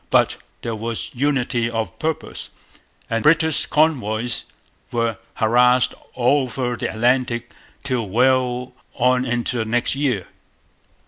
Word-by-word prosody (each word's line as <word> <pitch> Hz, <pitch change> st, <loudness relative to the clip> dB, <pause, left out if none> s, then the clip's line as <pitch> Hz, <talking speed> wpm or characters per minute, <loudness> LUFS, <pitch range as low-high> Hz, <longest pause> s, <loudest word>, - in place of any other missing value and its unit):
But -, -, +3 dB, 0.3 s
there 115 Hz, -, -2 dB
was 115 Hz, +1 st, -4 dB
unity 125 Hz, -3 st, 0 dB
of 115 Hz, -6 st, -4 dB
purpose; 160 Hz, 0 st, -3 dB, 0.6 s
and 115 Hz, -1 st, -1 dB
British 160 Hz, +3 st, +3 dB
convoys 125 Hz, -7 st, +1 dB, 0.5 s
were 115 Hz, -2 st, -1 dB, 0.2 s
harassed 125 Hz, +3 st, +4 dB, 0.2 s
all 130 Hz, +3 st, +3 dB
over 125 Hz, 0 st, -2 dB
the -, -, -3 dB
Atlantic 120 Hz, 0 st, +1 dB, 0.3 s
till 125 Hz, -7 st, -1 dB
well 125 Hz, +2 st, +2 dB, 0.2 s
on 125 Hz, +1 st, +2 dB
into 120 Hz, 0 st, -1 dB
the 110 Hz, -, 0 dB
next 120 Hz, +2 st, +1 dB
year. 130 Hz, -, 0 dB
125 Hz, 120 wpm, -21 LUFS, 115-130 Hz, 0.6 s, harassed